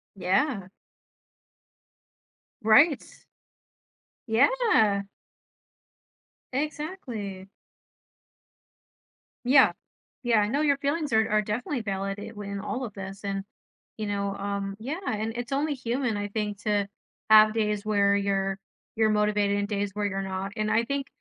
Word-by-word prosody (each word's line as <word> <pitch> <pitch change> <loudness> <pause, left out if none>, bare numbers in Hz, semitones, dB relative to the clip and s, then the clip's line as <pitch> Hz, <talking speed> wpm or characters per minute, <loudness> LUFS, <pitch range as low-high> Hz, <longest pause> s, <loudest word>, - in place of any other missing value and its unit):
Yeah. 195 +2 0 1.9
Right. 260 +7 +5 1.2
Yeah.r 225 - +3 1.5
Exactly. 260 - -4 2.0
Yeah. 265 +1 +6 0.5
Yeah, 235 -2 +3
I 205 - +2
know 275 +7 0
your 285 -2 +3
feelings 290 +1 -1
are 220 0 +3
are 215 0 +3
definitely 235 +5 -2
validated 195 +1 -4
when 200 -1 -5
all 250 +5 -3
of 210 - -8
this 195 +1 -8
and, 195 -1 -2 0.5
you 215 - -3
know, 200 -1 -1
um, 200 0 -3
yeah, 280 +10 -4
and 220 +1 -1
it's 245 +2 -5
only 290 +2 +1
human, 245 -2 -1
I 205 0 -3
think, 210 -1 -3
to 205 -2 +1 0.4
have 215 0 +8
days 210 -2 -1
where 200 -1 +3
you're 195 -1 0 0.4
you're 220 -1 +3
motivated 210 -1 +2
and 205 - -1
days 205 -1 -2
where 210 0 -2
you're 195 -1 -1
not, 195 +1 -4
and 215 -1 -1
I 230 - +3
think 280 +1 -2
210 Hz, 125 wpm, -27 LUFS, 200-245 Hz, 2.0 s, have